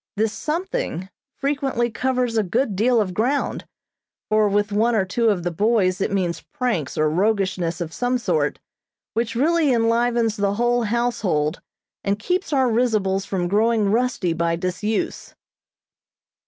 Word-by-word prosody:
This 215 +1 0
something 330 - -3 0.3
frequently 275 -4 -1
covers 250 0 0
a 220 - +3
good 215 +3 0
deal 235 +4 +3
of 190 -4 -1
ground, 250 +9 -1 0.6
for 215 -1 +3
with 205 +1 +1
one 225 +3 +2
or 195 -3 +2
two 230 +4 +1
of 190 -5 0
the 175 - -1
boys 195 0 +1
it - - 0
means 180 -4 -1
pranks 220 - -3
or 155 - +3
roguishness 185 -1 0
of 165 -1 -4
some 245 +1 0
sort, 360 - 0 0.6
which 230 0 -1
really 310 +3 +3
enlivens 230 -1 +2
the 200 0 0
whole 240 +2 +2
household 210 -9 0 0.4
and 200 0 0
keeps 360 - -2
our 265 -3 +3
risibles 215 -5 +1
from 180 -3 -1
growing 215 +1 +2
rusty 230 -7 +1
by 165 0 0
disuse. 185 +5 -3
220 Hz, 145 wpm, -22 LUFS, 190-245 Hz, 0.6 s, a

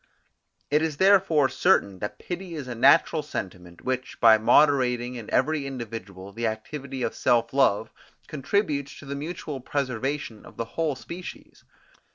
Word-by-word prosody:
It 150 +1 +3
is 160 -3 -2
therefore 190 -7 +4
certain 100 -7 +2
that 105 - -5
pity 175 -1 -6
is 145 -5 -6
a 125 - -4
natural 155 +6 +4
sentiment, 90 - -7
which, 130 0 -3
by 110 -1 +7
moderating 125 -1 +3
in 115 -4 -8
every 155 -3 +1
individual 110 -7 -7
the 115 +3 -2
activity 130 +4 -5
of - - -1
self 115 0 +1
love, 110 -5 +2 0.3
contributes 150 -2 -2
to - - -12
the 140 - -5
mutual 150 -1 -5
preservation 130 -3 -3
of - - -15
the 115 - -2
whole 160 -4 0
species. 170 +7 -10
135 Hz, 150 wpm, -25 LUFS, 115-150 Hz, 0.3 s, by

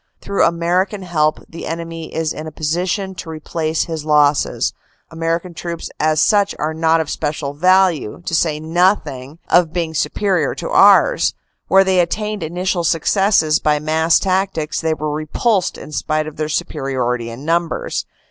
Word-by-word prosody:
Through 200 - 0
American 180 +4 0
help 155 -4 0
the 165 - -8
enemy 165 0 -6
is 160 -1 -2
in 155 +1 -7
a - - -7
position 180 +6 -2
to 180 - -8
replace 160 0 -2
his 160 -2 -5
losses. 150 -1 +2 0.4
American 165 +2 -2
troops 170 0 -6
as 155 0 +2
such 205 +1 +3
are 155 +1 -2
not 160 +1 +2
of 160 - -2
special 150 -2 -3
value, 180 - +2
to - - -4
say 155 -2 +1
nothing 155 -4 0
of 175 -3 +3
being 170 -2 -2
super 190 +4 0
ior - - -1
to - - -5
ours. - - +5 0.3
Where 195 0 +5
they 190 -1 +2
attained 210 +4 -1
initial 175 +2 -2
successes 165 -1 +2
by 150 -1 +2
mass 160 +2 +2
tac 190 0 0
tics 155 -1 -3
they 160 -1 0
were 150 -1 -3
repulsed 180 +6 0
in - - -10
spite 155 0 -1
of 155 -1 -9
their 155 0 -2
superiority 125 -6 -2
in 120 +5 -9
numbers. 170 0 -1
165 Hz, 165 wpm, -18 LUFS, 155-180 Hz, 0.4 s, ours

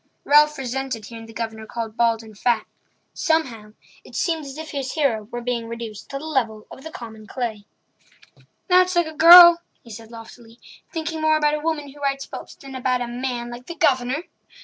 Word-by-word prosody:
Ralph 300 +1 +5
resented 260 -3 -4
hearing 225 0 -10
the - - -12
Governor 220 -1 -5
called 225 -2 -5
bald 230 -1 +1
and 220 -1 -14
fat. 230 +1 0 0.5
Somehow 240 -10 -1 0.3
it - - -14
seemed 325 -3 -1
as 275 +1 -9
if 315 0 -7
his 270 -2 -4
hero 250 -9 0
were 240 +3 -6
being 235 -2 -2
reduced 230 -3 -8
to 275 - -4
the 290 - -8
level 230 -8 -2
of 320 +4 -10
common 220 -4 -10
clay. 220 -5 -4 1.0
"That's 365 0 +4
like 345 -1 +3
a 315 - -7
girl," 345 +2 +10 0.2
he 235 - -14
said 225 +1 -10
loftily; 230 0 -13 0.3
"thinking 320 -1 -4
more 310 0 +3
about 300 -1 +2
a 300 - -1
woman 300 -2 -3
who 290 - -15
writes 275 -1 -1
books - - -9
than 275 -1 -12
about 255 -1 -1
a 245 - -2
man 240 0 -4
like 245 +1 -10
the 340 - -7
Governor!" 260 +1 +1
255 Hz, 195 wpm, -22 LUFS, 230-300 Hz, 1.0 s, girl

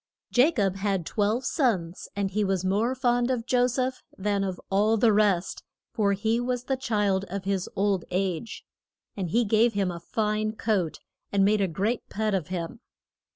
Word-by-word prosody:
JA 255 +5 +6
COB 195 - 0
had 195 -3 -1
twelve 215 +7 0
sons, 195 - 0
and 200 -1 -1
he 210 +2 +1
was 190 -2 0
more 215 +7 +1
fond 245 -1 +1
of 245 -3 -1
Jo 250 -1 +3
seph 255 +1 -2 0.2
than 200 0 0
of 190 -2 -3
all 210 +3 +3
the 220 0 +4
rest; 200 -4 +2 0.3
for 210 -4 +2
he 220 +4 0
was 245 0 -2
the 265 +1 -1
child 210 -7 0
of 195 +1 -5
his 195 -1 -1
old 195 -2 +1
age. 185 +3 -2 0.5
And 185 -4 -3
he 235 +7 +2
gave 225 +3 +3
him 195 -3 0
a 170 - -6
fine 215 +4 -1
coat, 205 -7 -1 0.3
and 195 -1 +3
made 210 +1 +3
a 195 - +2
great 200 +8 -2
pet 215 0 -1
of 180 -6 -1
him. 180 +3 -4
205 Hz, 185 wpm, -27 LUFS, 190-230 Hz, 0.5 s, JA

